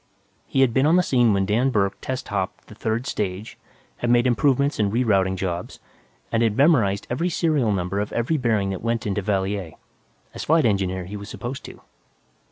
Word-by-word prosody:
He 135 - +1
had 130 -4 +3
been 135 +4 +3
on 165 - +4
the 180 - +4
scene 120 -7 +3
when 100 -1 +1
Dan 115 +7 +2
Burke 100 -5 +1
test 130 0 -4
hopped 100 -1 -3
the - - -13
third 110 +3 -2
stage, 100 -4 -4 0.4
had 120 - -2
made 120 0 +4
improvements 140 +3 +2
and 100 -2 +1
re 120 +4 +1
routing 95 -4 +2
jobs, 90 -2 -4 0.5
and 115 - +1
had 110 -2 +1
memorized 120 -10 +3
every 165 +9 0
serial 155 -9 +1
number 95 0 -1
of 105 - -3
every 120 +7 0
bearing 110 -7 0
that 95 - -5
went 115 0 -1
into 105 0 -1
Valier. 95 -3 -2 0.6
As - - -6
Flight 160 -2 +3
Engineer, 95 -4 0
he 100 +4 -8
was 100 +1 -9
supposed 125 +4 -6
to. - - -11
110 Hz, 195 wpm, -23 LUFS, 100-130 Hz, 0.6 s, on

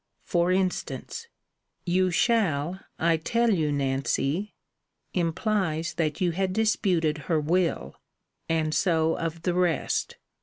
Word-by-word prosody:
For 175 +1 +1
instance 190 - -2 0.6
You 185 +1 +2
shall, 180 - +1 0.2
I 165 0 +2
tell 230 +8 +1
you, 155 -5 +1
Nancy, 140 +6 -1 0.6
implies 170 -2 0
that 155 -3 -1
you 180 -2 +2
had 185 +2 -1
disputed 180 -7 +1
her 160 -2 +3
will 160 - 0 0.5
and 160 -1 +1
so 160 0 +2
of 165 0 -4
the 180 - +1
rest. 175 -4 0
170 Hz, 115 wpm, -26 LUFS, 155-185 Hz, 0.6 s, her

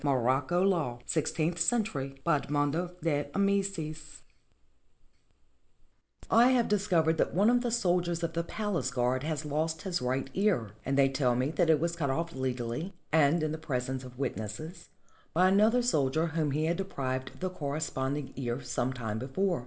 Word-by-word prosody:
MOROCCO 135 +5 +2
LAW 165 -11 +1
[Sixteenth 165 +2 0
century] 165 - 0
BY 170 -3 +3
EDMONDO 145 +5 -1
DE 145 -4 0
AMICIS 190 -6 -1 2.1
I 235 +2 +7
HAVE 250 -3 +3
discovered 170 -6 +2
that - - +1
one 205 +5 +5
of 245 0 +3
the 245 - -1
soldiers 175 -6 +1
of 165 0 -1
the 170 0 -1
palace 185 -7 -2
guard 125 0 0
has 155 +1 -3
lost 155 +2 -1
his 180 -3 -2
right 130 +2 -1
ear, 185 - +1 0.2
and 135 0 +1
they 135 -1 +6
tell 130 -2 +1
me 130 +4 0
that 160 +1 +1
it 155 -2 +5
was 170 +2 -1
cut 150 -5 -1
off 165 +5 -1
legally, 130 - -3 0.2
and 155 +1 +4
in 155 - 0
the 155 - -4
presence 130 -3 -3
of 125 -1 -11
witnesses, 140 - -5 0.5
by 180 +2 +5
another 215 +6 +4
soldier 155 - +2
whom 160 -2 0
he 150 +3 0
had 170 +1 0
deprived 130 -9 -3
of - - -18
the 185 0 -2
corre 145 -4 -3
sponding 135 -2 -3
ear 120 -2 -2
sometime 120 -5 -3
before. 175 - 0
155 Hz, 170 wpm, -30 LUFS, 135-175 Hz, 2.1 s, I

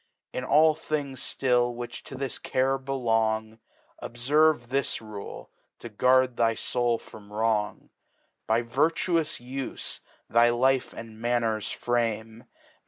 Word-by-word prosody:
1^ 125 - -3
all 155 +1 +6
Things 145 -4 -4
flill 120 -2 +2
which 120 0 -6
to - - -9
this 135 0 -4
Care 135 +1 +1
belong, 115 -4 0 0.4
Dbferve 135 +1 +2
this 135 +1 0
Rule, 110 -3 -9 0.3
to 120 - -9
guard 125 +3 +3
thy 115 -1 +3
Soul 120 -1 0
from 105 -2 -14
Wrong. 105 -1 -1 0.6
By 115 +2 +2
virtuous 160 +6 +1
Ufc 130 +2 -5 0.3
thy 120 +1 +5
Life 130 +2 +2
and 110 -1 -10
Manners 115 -3 0
frame. 115 -1 -2
120 Hz, 120 wpm, -27 LUFS, 115-135 Hz, 0.6 s, all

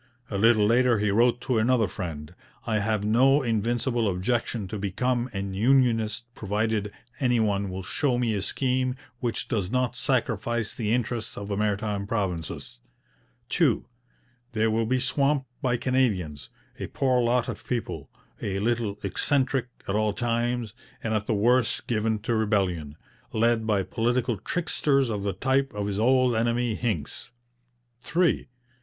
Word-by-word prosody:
A 100 - -1
little 110 -1 +5
later 120 +2 +4
he 105 -1 +1
wrote 120 +3 +3
to 125 -3 +1
another 115 -1 +3
friend: 85 -4 -6 0.3
'I 110 -2 +1
have 105 0 0
no 135 +6 +4
invincible 115 0 0
objection 110 +2 -1
to 105 - -4
become 120 +6 -1
an 95 -1 -4
unionist 115 -1 +2
provided 105 0 -1 0.3
any 125 -4 +2
one 100 -2 +1
will 95 +1 -5
show 125 +7 0
me 120 -2 +1
a 100 - -1
scheme 130 +3 0 0.2
which 120 -2 -2
does 100 -7 -1
not 125 +1 0
sacrifice 120 -3 0
the 110 -3 -2
interests 120 -1 -1
of 100 0 -6
the 100 - -1
Maritime 105 -1 -1
Provinces.' 90 - -3 0.7
2. - - +2 0.7
They 110 0 +2
will 110 0 +1
be 130 +2 +2
swamped 140 +2 +1 0.2
by 125 -4 +1
Canadians, 105 - 0 0.3
a - - -3
poor 130 -2 +1
lot 120 +1 +2
of - - -6
people, 120 -2 -3 0.3
a 100 -2 -2
little 110 -1 0
eccentric 130 +5 0 0.2
at 95 - -1
all 105 0 +1
times, 120 -1 -1 0.3
and 115 - -1
at 110 -1 -1
the 110 - +1
worst 120 +3 +2
given 110 -1 0
to 120 - 0
rebellion 95 -9 0 0.4
led 115 0 +2
by 100 -3 +2
political 120 +2 0
tricksters 140 - 0
of 105 -2 -2
the 100 -1 -1
type 135 +7 +1
of 105 -1 -2
his 100 0 -2
old 125 +1 +4
enemy 120 +1 +1
Hincks. 105 -11 -3 0.7
3. 170 +7 +1
115 Hz, 150 wpm, -26 LUFS, 105-125 Hz, 0.7 s, little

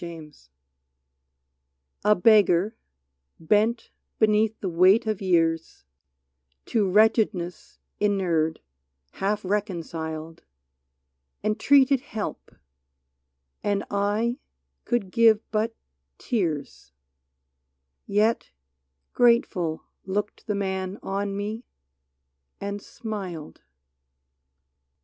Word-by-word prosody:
74 170 -2 -7
ALMS 145 - -21 1.5
A 210 +1 +5
BEGGAR, 205 0 +4 0.6
bent 215 +7 +1 0.3
beneath 215 0 +2
the 195 - -3
weight 185 +6 +4
of 215 -2 -2
years, 165 - 0 0.4
— 65 0 -49
To 210 -4 +2
wretchedness 210 -3 +1 0.2
inured, 175 -6 +1 0.5
half 200 +1 -2
reconciled, 165 -5 -4 0.5
— 65 - -52
Entreated 265 +5 +4
help, 220 -5 -6 1.1
and 205 -1 0
I 210 +5 0 0.5
could 230 -6 -1
give 225 -1 +5
but 220 +1 0 0.4
tears; 160 - -3 1.1
Yet 215 +3 +1 0.6
grateful 215 -9 +2 0.2
looked 205 +2 -3
the 210 - 0
man 190 -1 -3
on 200 0 -2
me, 215 +3 -4 1.0
and 200 0 -4
smiled. 190 -10 -7
200 Hz, 80 wpm, -25 LUFS, 170-215 Hz, 1.5 s, A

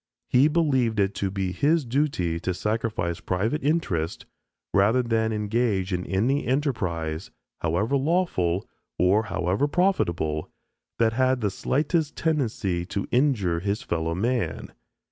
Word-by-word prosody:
He 130 +4 +5
believed 135 -9 +1
it 100 0 +2
to 100 - +1
be 95 -1 -2
his 145 - +2
duty 115 - 0
to 90 +1 -2
sacrifice 105 -5 -1
private 110 - -1
interest, 115 - -1 0.5
rather 110 +6 +4
than 110 -1 +1
engage 105 -3 0
in 90 0 -2
any 120 +9 +1
enterprise, 95 - -1 0.3
however 90 - 0
lawful... 135 - 0 0.3
or 100 +5 +3
however 95 +11 0
profitable, 85 - 0 0.5
that 115 -1 +2
had 130 +1 +2
the 105 -2 0
slightest 155 - 0
tendency 110 - 0
to 100 0 -3
injure 120 - +2
his 100 +7 -2
fellow 85 -7 -1
man. 120 +5 -1
110 Hz, 125 wpm, -25 LUFS, 90-135 Hz, 0.5 s, He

